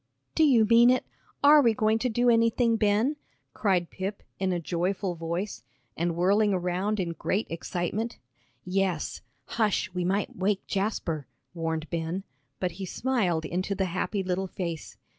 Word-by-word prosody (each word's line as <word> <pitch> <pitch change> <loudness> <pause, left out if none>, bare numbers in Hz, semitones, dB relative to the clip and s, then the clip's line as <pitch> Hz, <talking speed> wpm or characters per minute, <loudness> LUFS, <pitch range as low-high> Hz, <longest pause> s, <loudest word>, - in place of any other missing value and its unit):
"Do 320 - +3
you 250 -7 +5
mean 235 +2 +6
it; 255 0 +2 0.4
are 295 +1 +8
we 230 -4 +3
going 215 +1 +2
to 250 - 0
do 240 +2 +1
anything, 230 0 +3
Ben?" 220 +7 +2 0.4
cried 185 -5 +1
Pip, 195 +2 -5 0.2
in 190 -1 +1
a 175 - 0
joyful 180 +3 -1
voice, 170 +4 -4 0.3
and 170 0 -1
whirling 200 +3 +3
around 185 +4 -1
in 180 -2 -1
great 190 +5 -1
excitement. 175 +7 -3 0.5
"Yes 185 -3 -1 0.2
hush, 215 -1 0
we 180 -1 -1
might 195 +3 -1
wake 195 +1 0
Jasper," 190 -7 -2 0.3
warned 160 -2 -2
Ben, 170 +3 -2 0.4
but 180 -1 -1
he - - -2
smiled 185 -10 0
into 185 +5 -2
the 190 - 0
happy 195 +2 -1
little 185 +1 -1
face. 170 -4 -5
195 Hz, 155 wpm, -27 LUFS, 175-220 Hz, 0.5 s, are